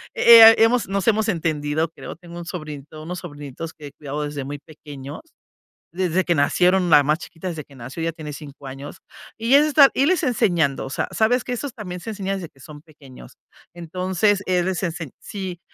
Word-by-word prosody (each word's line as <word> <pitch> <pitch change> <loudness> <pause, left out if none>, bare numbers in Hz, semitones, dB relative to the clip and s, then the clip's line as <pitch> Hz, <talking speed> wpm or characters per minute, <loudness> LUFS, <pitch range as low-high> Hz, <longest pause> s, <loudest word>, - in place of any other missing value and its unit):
Eh, 230 -1 +9
eh, - - +2
hemos 225 0 +3
nos 195 -1 -2
hemos 220 0 +1
entendido, 155 -3 -1
creo, - - -9
tengo 170 0 -12
un 170 - -8
sobrinito 155 -3 -8
unos 180 +2 -6
sobrinitos 145 -1 -8
que 150 -2 -11
he - - -11
cuidado 150 0 -5
desde 145 -2 -5
muy 145 0 -6
pequeños, 145 -2 -10 0.7
desde 185 0 0
que 170 - +1
nacieron, 180 +5 +2
la 150 -2 +7
más 150 +2 +1
chiquita 175 +2 -9
desde 160 -3 -6
que 140 - -20
nació, 130 +7 -7
ya 165 - -1
tiene 155 -2 -8
5 140 -2 -11
años, 135 +2 -9 0.4
y 230 +4 0
es 295 +1 +6
estar 290 -2 +6
y 270 - +1
irles 350 +2 +2
enseñando. 175 - +1
O - - -7
sea, - - -2
sabes 230 +2 +1
que 250 - -3
esos 255 0 -5
también 180 -4 -7
se 225 - -7
enseña 195 -1 -3
desde 175 -4 -7
que 135 - -27
son 145 +2 -12
pequeños. 140 - -16 0.4
Entonces, 185 +4 0
es 180 -1 +1
re 190 - 0
ensen 165 -4 -5
sí, 190 -4 -7
170 Hz, 205 wpm, -22 LUFS, 145-195 Hz, 0.7 s, Eh